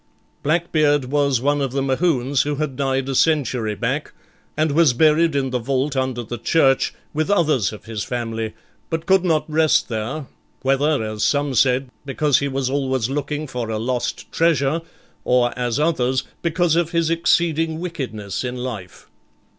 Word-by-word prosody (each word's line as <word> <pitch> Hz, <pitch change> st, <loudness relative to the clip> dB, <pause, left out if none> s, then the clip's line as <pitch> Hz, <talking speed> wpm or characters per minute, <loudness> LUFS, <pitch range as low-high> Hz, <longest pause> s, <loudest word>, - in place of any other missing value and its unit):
Blackbeard 155 Hz, -3 st, +2 dB
was 140 Hz, -4 st, +2 dB
one 145 Hz, +2 st, +1 dB
of 135 Hz, -2 st, -2 dB
the 135 Hz, -, 0 dB
Mohunes 135 Hz, -2 st, +1 dB
who 145 Hz, 0 st, -1 dB
had 145 Hz, -2 st, -3 dB
died 135 Hz, -1 st, -1 dB
a 135 Hz, -, -2 dB
century 125 Hz, -7 st, +1 dB
back, 125 Hz, +9 st, -2 dB, 0.4 s
and 155 Hz, -1 st, +2 dB
was 155 Hz, -3 st, +4 dB
buried 155 Hz, +3 st, +3 dB
in 135 Hz, -2 st, 0 dB
the 125 Hz, -, 0 dB
vault 135 Hz, +3 st, -1 dB
under 130 Hz, -2 st, -1 dB
the 120 Hz, +1 st, -6 dB
church, 135 Hz, +1 st, +3 dB, 0.2 s
with 155 Hz, +3 st, -1 dB
others 155 Hz, -, +2 dB
of 105 Hz, -, -11 dB
his 110 Hz, -2 st, -4 dB
family, 115 Hz, -2 st, -4 dB, 0.3 s
but 160 Hz, 0 st, -3 dB
could 190 Hz, 0 st, +4 dB
not 160 Hz, -4 st, +1 dB
rest 155 Hz, -2 st, +2 dB
there, 120 Hz, +6 st, -3 dB, 0.4 s
whether, 135 Hz, 0 st, +2 dB
as 110 Hz, -1 st, -3 dB
some 145 Hz, -1 st, +1 dB
said, 130 Hz, +1 st, +2 dB
because 145 Hz, 0 st, +1 dB
he 140 Hz, -, -1 dB
was 135 Hz, -1 st, -2 dB
always 130 Hz, -3 st, -1 dB
looking 145 Hz, +2 st, -2 dB
for 125 Hz, -5 st, -4 dB
a 110 Hz, -, -1 dB
lost 120 Hz, +2 st, -3 dB
treasure, 165 Hz, -2 st, +2 dB, 0.4 s
or 125 Hz, -1 st, +2 dB
as 125 Hz, 0 st, -1 dB
others, 130 Hz, -5 st, +1 dB, 0.2 s
because 170 Hz, -1 st, +1 dB
of 170 Hz, -1 st, +1 dB
his 165 Hz, -2 st, 0 dB
exceeding 165 Hz, -1 st, +1 dB
wickedness 130 Hz, -, -4 dB
in 125 Hz, 0 st, -4 dB
life. 115 Hz, -8 st, -7 dB
135 Hz, 165 wpm, -21 LUFS, 125-155 Hz, 0.4 s, was